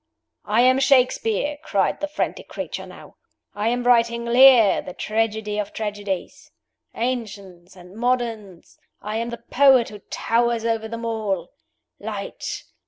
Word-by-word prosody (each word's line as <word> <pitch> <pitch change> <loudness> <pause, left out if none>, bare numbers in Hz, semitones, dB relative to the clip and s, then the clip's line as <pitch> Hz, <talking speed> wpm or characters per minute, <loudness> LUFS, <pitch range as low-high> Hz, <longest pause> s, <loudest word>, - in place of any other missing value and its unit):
"I 215 +3 +2
am 255 +1 +4
Shakespeare!" 270 0 +2
cried 200 - 0
the 295 - -2
frantic 295 - -4
creature - - -6
now. - - -14 0.4
"I 205 +2 -2
am 245 +1 0
writing 235 -1 +2
'Lear,' 240 -3 +6
the 180 - -9
tragedy 215 -1 -2
of 205 -1 -4
tragedies. 205 -3 -5 0.5
Ancients 200 -7 -5
and 180 +1 -15
moderns, 230 -6 -3 0.2
I 215 +1 -3
am 230 +1 -2
the 235 0 -8
poet 265 -3 +5
who 210 - -10
towers 235 0 0
over 225 -1 -1
them 230 +1 -6
all. 205 -6 -3 0.5
Light! - - -6
225 Hz, 135 wpm, -22 LUFS, 210-245 Hz, 0.5 s, Lear